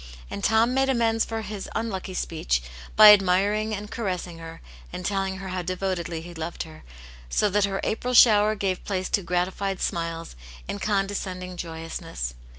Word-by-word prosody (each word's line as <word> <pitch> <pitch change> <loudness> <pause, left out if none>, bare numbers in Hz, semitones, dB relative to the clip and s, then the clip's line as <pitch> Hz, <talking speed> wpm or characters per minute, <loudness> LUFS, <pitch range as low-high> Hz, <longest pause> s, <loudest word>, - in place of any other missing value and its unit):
And 200 - -5
Tom 225 +3 +3
made 270 +1 +2
amends 230 -3 +2
for 225 0 -4
his 205 -1 -6
unlucky 195 -4 -3
speech 60 - -1 0.3
by 215 -1 +11
admiring 205 +3 +2
and 210 +1 -8
caressing 180 -6 -3
her, 165 0 -9 0.3
and 180 - -6
telling 195 -1 -1
her 195 0 -7
how 185 0 -2
devotedly 180 -2 -3
he 175 +1 -10
loved 165 +1 -4
her, 160 -1 -13 0.5
so 205 - +2
that 205 +1 +3
her 195 -1 -2
April 250 +3 -1
shower 215 -2 +7
gave 195 -3 -2
place 185 -2 -2
to 200 - +2
gratified 185 +2 -1
smiles 165 - -3 0.3
and 200 - -5
condescending 195 -3 -2
joyousness. 160 - -5
190 Hz, 160 wpm, -25 LUFS, 175-210 Hz, 0.5 s, by